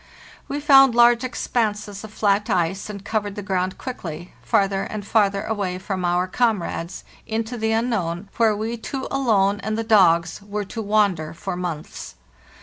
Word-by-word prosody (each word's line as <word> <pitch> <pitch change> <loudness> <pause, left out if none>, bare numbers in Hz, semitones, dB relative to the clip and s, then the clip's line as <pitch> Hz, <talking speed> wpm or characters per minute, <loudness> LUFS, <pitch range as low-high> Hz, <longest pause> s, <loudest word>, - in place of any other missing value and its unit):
We 285 - -3
found 270 -4 +6
large 240 0 +5
expanses 210 -5 -2
of 215 - -9
flat 205 -1 +1
ice, 180 +4 0
and 200 -1 -8
covered 205 -2 -2
the 205 - -5
ground 185 -1 -1
quickly, 175 -10 -7
farther 195 -1 +1
and 205 0 -5
farther 200 -2 +2
away 200 -5 -2
from 185 0 -4
our 175 +1 +1
com 220 -2 +1
rades, 170 +3 -5 0.2
into 225 +2 -2
the 220 -1 -1
unknown, 205 -6 -1
where 225 -2 +3
we 225 +3 -3
two 265 +3 -5
alone 205 -7 +2
and 215 +1 -3
the 225 - -1
dogs 180 -6 +3
were 205 +1 -4
to 225 +4 -6
wander 200 -7 +1
for 190 +1 -4
months. 175 -4 -6
205 Hz, 165 wpm, -22 LUFS, 185-225 Hz, 0.2 s, found